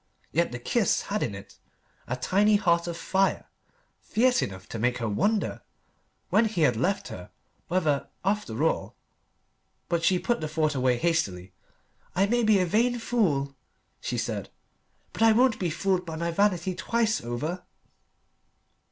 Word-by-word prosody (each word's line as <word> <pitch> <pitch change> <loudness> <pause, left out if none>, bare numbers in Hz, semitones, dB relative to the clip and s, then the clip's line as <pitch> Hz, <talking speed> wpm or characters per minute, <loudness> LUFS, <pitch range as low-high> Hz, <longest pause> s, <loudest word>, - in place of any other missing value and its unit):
Yet 170 -2 +1
the 120 - -4
kiss 205 - +1
had 210 - 0
in 105 - -2
it 100 - -12 0.5
a 125 - -1
tiny 200 +11 +3
heart 170 -4 +2
of 170 -1 -4
fire, 195 +2 0 0.5
fierce 250 +3 +2
enough 95 0 -5
to 115 - -5
make 125 +2 +1
her 115 -2 -2
wonder, 200 - 0 0.7
when 220 +2 +4
he 210 -6 -1
had 130 -6 +4
left 185 - -1
her, 90 - -9 0.4
whether, 155 -6 0 0.2
after 195 - -1
all.... 165 - 0 0.9
But 170 -1 0
she 185 +2 +4
put 235 +4 -1
the 155 - -2
thought 155 0 0
away 130 -2 +2
hastily. 100 - -1 0.6
"I 190 +2 +4
may 240 +4 +1
be 215 -2 +4
a 185 - +2
vain 235 +7 +2
fool," 170 - 0 0.5
she - - -3
said, - - -3 0.6
"but - - -7
I 225 -1 +6
won't 245 0 +3
be 180 - 0
fooled 185 +2 0
by 165 -2 -6
my 170 +1 -2
vanity 185 -1 +1
twice 225 +4 0
over." 150 +10 -4
175 Hz, 160 wpm, -27 LUFS, 140-210 Hz, 0.9 s, I